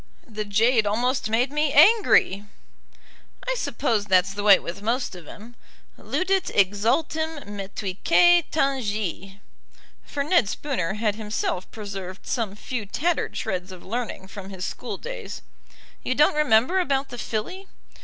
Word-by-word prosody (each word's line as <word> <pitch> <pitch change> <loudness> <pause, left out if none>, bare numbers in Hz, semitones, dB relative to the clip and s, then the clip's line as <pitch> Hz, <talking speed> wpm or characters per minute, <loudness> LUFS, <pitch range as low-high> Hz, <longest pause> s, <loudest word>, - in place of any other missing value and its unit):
"The 215 -2 -5
jade 220 +2 +3
almost 240 +3 0
made 240 +4 +1
me 300 0 +1
angry." 310 - +5 1.0
"I - - +1
suppose 225 - -1
that's 190 -1 +3
the 205 - -4
way 205 -2 +7
with 170 +4 -7
most 235 +3 -1
of 175 -4 -11
'em. 225 +3 -12 0.4
'Ludit 380 0 -1
exultim 285 - +1
metuitque 205 - +2
tangi'." 210 - -2 0.6
For 280 - -3
Ned 300 - +3
Spooner 205 - -2
had 210 -1 -1
himself 210 -4 -3
preserved 195 -3 -8
some 220 -5 -2
few 220 0 -5
tattered 335 - -1
shreds 185 -3 -3
of 185 -2 -12
learning 225 -3 -4
from 195 -1 -9
his 190 -1 -5
school - - -5
days. - - -7 0.6
"You 255 - -1
don't 300 +2 +4
remember 300 +3 +3
about 280 -6 0
the 245 - -8
filly?" 365 - -4
220 Hz, 135 wpm, -24 LUFS, 200-285 Hz, 1.0 s, way